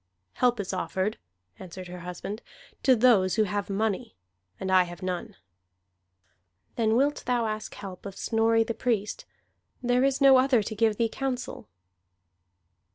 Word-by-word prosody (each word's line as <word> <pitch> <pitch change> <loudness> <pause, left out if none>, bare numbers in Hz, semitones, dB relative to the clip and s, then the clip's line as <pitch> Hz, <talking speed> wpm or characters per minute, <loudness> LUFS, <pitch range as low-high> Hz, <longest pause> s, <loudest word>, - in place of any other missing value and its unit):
"Help 245 -2 +2
is 195 -1 -3
offered," 190 +2 -2 0.4
answered 185 0 -9
her 180 0 -8
husband, 180 +5 -6 0.4
"to 260 -2 +5
those 215 -6 +4
who 220 - +3
have 205 0 -2
money. 200 - -2 0.4
And 190 0 -3
I 185 0 +6
have 175 +2 -10
none." 180 -1 -4 1.4
"Then 225 -1 +2
wilt 280 +4 +2
thou 245 -2 +1
ask 215 0 -4
help 190 0 -8
of 195 - -9
Snorri 225 0 +2
the 230 - -3
Priest? 220 -4 -2 0.6
There 245 +1 +2
is 270 0 +2
no 270 -2 +7
other 255 -4 +3
to 215 +2 -5
give 220 -1 +2
thee 230 - +2
counsel." 255 +1 -4
220 Hz, 150 wpm, -27 LUFS, 190-245 Hz, 1.4 s, no